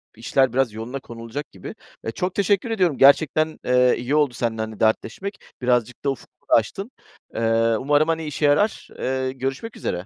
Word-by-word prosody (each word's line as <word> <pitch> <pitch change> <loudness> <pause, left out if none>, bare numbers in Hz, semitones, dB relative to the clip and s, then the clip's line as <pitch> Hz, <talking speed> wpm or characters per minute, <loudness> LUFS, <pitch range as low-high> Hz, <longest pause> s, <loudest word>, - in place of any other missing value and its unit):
işler 125 +3 +1
biraz 130 -4 +1
yoluna 115 +5 -5
konulacak 120 +4 -8
gibi. 95 - -9 0.3
E, 115 - -3
çok 180 +9 -3
teşekkür 200 +3 +1
ediyorum. 180 - +1
Gerçekten, 155 +3 +4
eee, 125 0 +4
iyi 125 +5 -1
oldu 145 -4 +2
seninle, 115 -2 -2
hani, 110 -1 -6
dertleşmek. 115 - -1 0.2
Birazcık 125 0 0
da - - +3
ufkumu 135 - -12
da - - +2
açtın. 195 - +1 0.4
Eee, 115 0 +2
umarım, 145 +3 +2
hani, 165 -1 -1
işe 150 0 -2
yarar. 150 +10 +2
Eee, 130 0 -1
görüşmek 135 - -4
üzere. 90 +1 -3
130 Hz, 175 wpm, -23 LUFS, 115-155 Hz, 0.4 s, Gerçekten